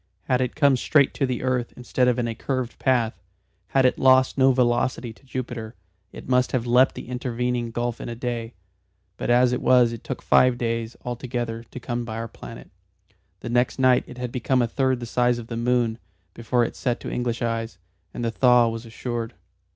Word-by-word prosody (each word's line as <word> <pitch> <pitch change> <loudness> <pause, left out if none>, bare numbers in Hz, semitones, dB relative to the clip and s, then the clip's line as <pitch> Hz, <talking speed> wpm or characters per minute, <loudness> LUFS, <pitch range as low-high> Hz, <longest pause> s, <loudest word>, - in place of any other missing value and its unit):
Had 125 0 +1
it 125 - -2
come 140 -3 +4
straight 140 +2 +3
to 135 - 0
the 125 -1 -3
earth 125 -2 -1
instead 125 0 0
of 125 -1 +2
in 120 -1 0
a 115 - -2
curved 130 +1 -3
path, 120 -4 +1 0.5
had 135 -1 +2
it 125 - +2
lost 130 0 +5
no 135 0 +5
velocity 125 -1 0
to 115 - -25
Jupiter, 120 -3 -6 0.4
it - - -11
must 125 0 +2
have 125 -2 0
leapt 125 +2 +4
the - - -8
intervening 125 -1 -2
gulf 120 +1 -3
in - - -6
a 120 - -5
day, 120 -1 -4 0.6
but - - -4
as 125 +1 +4
it 125 - -2
was 125 -2 +5
it 115 - -8
took - - -6
five 125 -1 +4
days 115 -1 -2
altogether 120 -2 -4
to 120 - -9
come 120 -1 -3
by 110 -2 -6
our 115 0 -4
planet. - - -11 0.7
The 120 - -6
next 120 +1 +1
night 130 -1 +4
it - - -11
had 125 -1 -4
become 125 +1 +1
a - - 0
third 130 +1 0
the - - -4
size 120 +1 +1
of 120 - -7
the 115 - -4
moon 120 -1 0 0.3
before 120 +1 0
it - - -3
set 120 -3 -1
to - - -5
English 120 -1 -2
eyes, 115 -3 -2 0.3
and 120 - -4
the 115 - 0
thaw 125 0 +4
was 115 +1 -6
assured. 115 0 -5
120 Hz, 205 wpm, -24 LUFS, 115-125 Hz, 0.7 s, lost